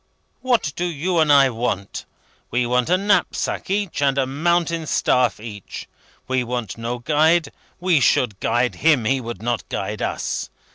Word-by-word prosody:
What 235 - +1
do 175 - -2
you 170 +2 -1
and 155 -2 +4
I 140 -2 +6
want? 115 -4 -3 0.4
We 125 0 0
want 125 +3 +1
a 180 - +4
knapsack 200 -2 0
each, 200 -5 -1
and 140 -1 +2
a 135 - +2
mountain 165 +3 0
staff 125 -5 +1
each. 105 -3 -8 0.4
We 130 -1 0
want 120 -4 -4
no 115 +2 -4
guide; 155 +4 +2 0.3
we 180 -3 +3
should 110 -6 +2
guide 120 +1 0
him; 150 -7 +3
he 135 +3 +1
would 115 -4 -7
not 120 -1 -2
guide - - -4
us. - - -3
135 Hz, 160 wpm, -21 LUFS, 120-165 Hz, 0.4 s, I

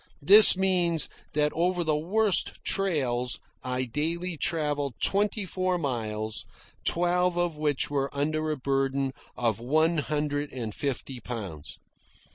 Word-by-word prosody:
This 200 +4 +9
means 175 -4 +2 0.3
that 150 0 +2
over 175 +1 0
the 155 -2 +1
worst 195 +6 +1
trails 130 -11 0 0.2
I 125 0 -2
daily 165 +8 -2
travelled 145 -4 -1
twenty 205 +1 +1
four 185 0 -1
miles, 110 -7 -3 0.4
twelve 175 +1 +1
of 175 -2 0
which 150 -2 -1
were 140 -1 0
under 155 +2 -1
a 155 - -1
burden 135 0 -1 0.3
of 115 -3 0
one 155 +7 +2
hundred 145 0 -2
and 115 -5 -5
fifty 135 -1 -4
pounds. 100 -11 -7
150 Hz, 125 wpm, -27 LUFS, 130-175 Hz, 0.4 s, This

